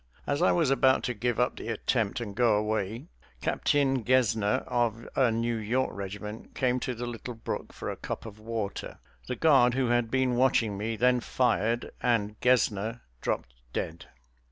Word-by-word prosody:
As 145 0 -1
I - - +5
was 160 -6 +2
about 130 0 +4
to 125 - -1
give 120 +1 -1
up 125 - +1
the - - -7
attempt 115 -1 0
and 105 -4 -5
go 115 -2 +4
away 110 +3 -2 0.3
Captain 135 - +1
Gesner, 110 -4 +2
of 120 -1 -1
a 130 -3 +4
New 115 +1 0
York 120 +5 0
regiment, 105 +2 -7
came 125 -1 +1
to 125 0 -3
the 120 +2 -4
little 120 0 -6
brook 115 - -5
for - - -7
a - - -2
cup - - -5
of 110 -1 -9
water. 110 -2 -4 0.3
The 125 - -2
guard 130 -5 +5
who 130 -2 +1
had 120 -1 +2
been 130 0 +1
watching 120 -4 +2
me 110 +3 -2
then 125 +2 +3
fired, 120 -2 0
and 110 -4 +1
Gesner 115 -2 +2 0.2
dropped - - -2 0.2
dead. 80 +1 -4
120 Hz, 175 wpm, -28 LUFS, 110-125 Hz, 0.3 s, I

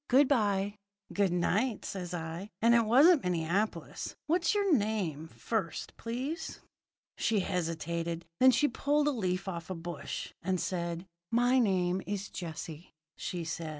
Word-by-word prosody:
Good 270 +2 +6
bye!' 205 -5 +1 0.3
"'Good 200 -3 +2
night,' 205 +6 +1
says 180 -3 -4
I, 170 +3 -5
'and 230 +1 +5
it 235 -1 +5
wasn't 285 +7 +7
Minneapolis. 180 +4 -1
What's 340 +5 +2
your 400 -4 +3
name, 200 - 0
first, 180 -1 -3
please?' 260 +8 -4 0.6
"She 220 -3 +2
hesitated. 170 -1 -2
Then 260 - +8
she 275 +4 +4
pulled 290 +3 +1
a - - +4
leaf 185 -7 -1
off 170 -3 -5
a 185 - -3
bush, 165 -3 -5
and 185 +1 0
said: 170 -1 -2 0.2
"'My 245 +2 +4
name 185 -4 +2
is 200 0 -3
Jessie,' 165 -1 -7 0.2
says - - -6 0.2
she. 165 0 -3
195 Hz, 145 wpm, -31 LUFS, 170-240 Hz, 0.6 s, Then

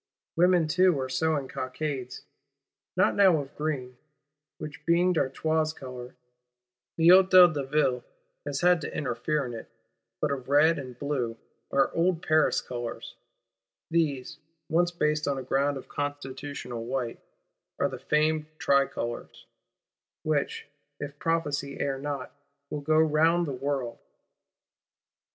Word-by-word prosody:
Women 175 -1 +4
too 180 -1 +3
are 130 0 -3
sewing 145 +1 0
cockades;—not 130 -4 -4
now 190 -5 +5
of 140 -1 -8
green, 130 -5 -3 0.6
which 155 -3 -8
being 175 +2 +3
D'Artois 155 +1 0
colour, 125 -1 -9 0.8
the 165 +1 +5
Hôtel 185 -2 +8
de 145 -2 -2
Ville 135 -3 +1 0.4
has 145 -1 -3
had 180 -1 +4
to - - -5
interfere 140 +2 -1
in 120 - -6
it; 115 - -8 0.5
but 150 - 0
of 135 -2 -4
red 155 +3 +4
and 130 -3 -8
blue, 125 -5 -2 0.3
our 135 0 +2
old 170 0 +1
Paris 155 0 +3
colours: 120 -2 -6 0.8
these, 150 -6 0 0.3
once 175 +2 +3
based 150 -3 0
on 140 -1 0
a 130 - -4
ground 140 +2 +1
of 130 - -10
constitutional 140 -4 -5
white, 125 -1 -3 0.6
are - - +2
the - - -7
famed 155 0 +1
TRICOLOR,—which 140 +2 -3 0.3
(if 145 0 -7
Prophecy 145 -4 -1
err 135 -1 -1
not) 140 -2 -4 0.4
"will 150 - -3
go 155 +2 +2
round 160 +2 +3
the 145 - -4
world." 135 -2 -3
145 Hz, 125 wpm, -27 LUFS, 130-160 Hz, 0.8 s, Hôtel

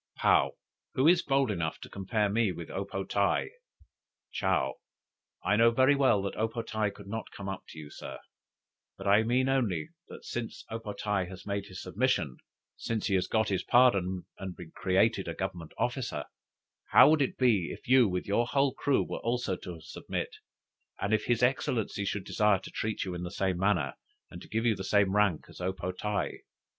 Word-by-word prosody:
'" - - -37
"Paou. - - +4 0.4
'Who 130 +4 +4
is 175 +1 +6
bold 135 -4 +2
enough 85 -5 -2
to - - -8
compare 105 +2 -1
me 105 0 +2
with 85 -1 -7
O 95 +1 -3
po 95 0 -4
tae?'" 100 +1 +1 0.8
"Chow. - - 0 0.7
'I 105 - +3
know 115 +1 +6
very 130 +4 +4
well 130 -8 +3
that 100 - -3
O 110 - +2
po 115 +1 -5
tae 110 -2 -1
could 100 0 -12
not 110 +3 -5
come 100 - -8
up 95 -1 -5
to - - -12
you, 75 -1 -9
Sir; - - -8 0.8
but - - -9
I 100 +2 +6
mean 125 +3 +2
only, 120 - 0 0.2
that - - -11
since 120 -2 -5
O 115 - -3
po 105 -2 -6
tae 100 -2 -1
has 90 -1 -10
made 100 0 -3
his 95 -1 -8
submission, 90 - 0 0.4
since 115 -2 -3
he 100 - 0
has 95 -1 +2
got 110 -1 +1
his 95 -2 0
pardon 95 -8 +3
and 95 -2 -6
been 85 -2 -10
created 95 +1 +2
a 85 - -4
Government 90 -4 -4
officer, 120 - -2 0.6
how - - +7
would 155 -2 +3
it 135 - 0
be, 110 -9 +3
if - - -10
you 130 -2 +6
with 90 0 -2
your 115 +4 +1
whole 135 +1 +2
crew 140 -2 +1
should - - -4
also 115 -7 -2
submit, 80 - -5 0.6
and 100 - 0
if 110 - +2
his 120 0 +1
Excellency 120 -5 0
should 100 0 -2
desire 105 -1 +3
to - - -10
treat 110 0 -2
you 95 - -4
in 90 - -5
the 90 - -4
same 95 -1 -1
manner, 95 -4 +1 0.4
and - - -9
to - - -13
give 110 +2 -1
you 115 -2 +3
the 95 - -6
same 100 0 +2
rank 105 -6 +2
as - - -12
O 90 +1 0
po 90 -1 -4
tae? 105 +3 -3
105 Hz, 205 wpm, -30 LUFS, 95-115 Hz, 0.8 s, how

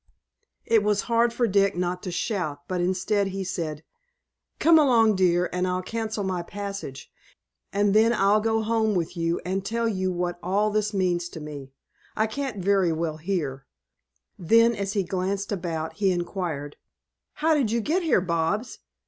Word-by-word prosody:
It 225 -2 +4
was 205 -1 +1
hard 235 0 +2
for 240 +1 +1
Dick 200 -2 +2
not 180 0 -1
to - - -5
shout, 170 -8 -2
but, 180 -1 -1
instead, 190 +3 +1
he 195 0 -4
said: 160 -4 -4 0.7
"Come 325 -1 +6
along, 230 -7 +4
dear, 180 -1 +3
and 180 +1 0
I'll 180 0 -1
cancel 220 +1 -3
my 185 -2 -1
passage, 200 -6 -7 0.6
and 200 0 +2
then 220 +2 +5
I'll 210 -1 +3
go 225 0 +1
home 220 -1 +1
with 170 0 -2
you 165 0 0
and 190 +1 -1
tell 230 +3 -1
you 190 -4 -1
what 175 0 -2
all 205 +4 +1
this 210 0 0
means 180 -3 0
to 165 - -9
me. 145 -3 -8 0.4
I 220 - +2
can't 220 -5 -4
very 195 -3 +3
well 160 -1 -2
here." 150 -6 -3 0.7
Then, 230 +7 +4
as 200 -2 -3
he 200 -3 +1
glanced 195 +3 -2
about, 165 -4 -3
he 200 -2 +2
inquired: 175 -5 -3 0.6
"How 320 +1 +2
did 275 -8 +2
you 235 +2 +1
get 315 - 0
here, 320 - +3
Bobs? 170 +6 -1
195 Hz, 170 wpm, -25 LUFS, 175-215 Hz, 0.7 s, Come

